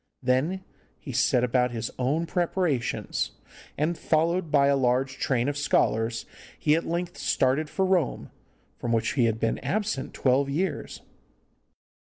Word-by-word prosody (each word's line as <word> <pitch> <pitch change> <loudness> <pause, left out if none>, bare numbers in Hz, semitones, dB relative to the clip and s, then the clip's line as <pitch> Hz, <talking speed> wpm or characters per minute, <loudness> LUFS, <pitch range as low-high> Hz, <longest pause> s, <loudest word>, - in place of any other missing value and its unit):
Then 140 +10 +1 0.3
he - - -8
set 125 - +2
about 125 0 +2
his 115 -2 -4
own 145 +7 +1
preparations, 170 -5 -1 0.4
and, 155 +4 0
followed 165 +2 +1
by 140 -2 +4
a 140 0 +4
large 130 +1 +1
train 125 -1 +1
of 145 - -1
scholars, 115 -5 +1 0.3
he 150 - +2
at 165 - 0
length 175 +2 -3
started 140 +4 +1
for 190 - 0
Rome, 180 -8 0 0.5
from 120 -1 -1
which 115 0 +1
he 125 -4 +3
had 115 -1 0
been 115 0 0
absent 210 -10 -2
twelve 135 +1 +2
years. 175 +7 -2
140 Hz, 145 wpm, -26 LUFS, 125-170 Hz, 0.5 s, by